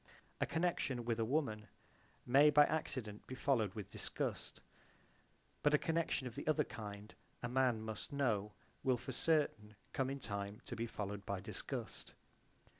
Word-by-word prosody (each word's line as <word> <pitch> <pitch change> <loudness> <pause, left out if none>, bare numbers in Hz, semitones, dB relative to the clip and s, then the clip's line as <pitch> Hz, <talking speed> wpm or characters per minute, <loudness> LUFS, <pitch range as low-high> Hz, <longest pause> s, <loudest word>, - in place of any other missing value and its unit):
A - - +2
connection 155 -8 0
with 115 -1 0
a 115 - +2
woman 110 -5 0 0.6
may 140 +4 +7
by 150 0 +8
accident 125 -9 -2
be 130 - -5
followed 115 -8 +2
with 105 -4 -6
disgust, - - -2 1.0
but 150 0 +5
a - - +6
connection 160 -4 0
of 125 - -4
the - - -6
other 155 0 +4
kind, 105 -4 -7 0.3
a - - +1
man 125 -3 +2
must 105 -4 -5
know, 110 -8 +1 0.3
will 130 -2 +3
for 125 +2 -6
certain 125 -8 +1 0.2
come 135 -1 +1
in 140 +1 -3
time 100 -2 -3
to - - -4
be 115 +1 -2
followed 105 -2 -4
by 100 -1 -1
disgust. 95 - -4
120 Hz, 160 wpm, -38 LUFS, 105-140 Hz, 1.0 s, by